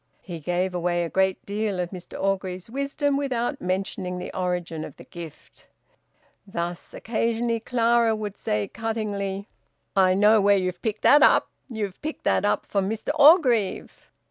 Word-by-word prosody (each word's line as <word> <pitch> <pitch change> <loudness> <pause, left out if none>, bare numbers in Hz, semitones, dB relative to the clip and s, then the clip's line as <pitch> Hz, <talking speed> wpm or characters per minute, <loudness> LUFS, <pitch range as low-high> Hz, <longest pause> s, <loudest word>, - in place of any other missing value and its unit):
He 175 -3 -7
gave 180 +4 -1
away 175 0 0
a 165 - -5
great 190 -1 +1
deal 205 -1 -2
of 175 -1 -2
Mr 180 -2 -9
Orgreave's 190 0 -2
wisdom 280 +1 -1
without 270 -1 -2
mentioning 185 0 -2
the 180 - -7
origin 175 -3 -2
of - - -9
the - - -13
gift. 170 -3 -12 0.8
Thus 175 -2 -5
occasionally 230 0 -1
Clara 230 -1 +2
would 210 -2 -5
say 105 - -2
cuttingly, 205 -3 -3 0.5
"I 185 -1 +4
know 210 +2 +5
where 200 0 +4
you've 180 -1 -2
picked 215 -2 -3
that 290 - +7
up. - - +5 0.2
You've 210 -5 -5
picked 310 +1 -5
that 95 -1 +2
up 105 0 +1
from 195 -1 -1
Mr 220 +4 -4
Orgreave." 285 - +3
200 Hz, 155 wpm, -25 LUFS, 180-230 Hz, 0.8 s, that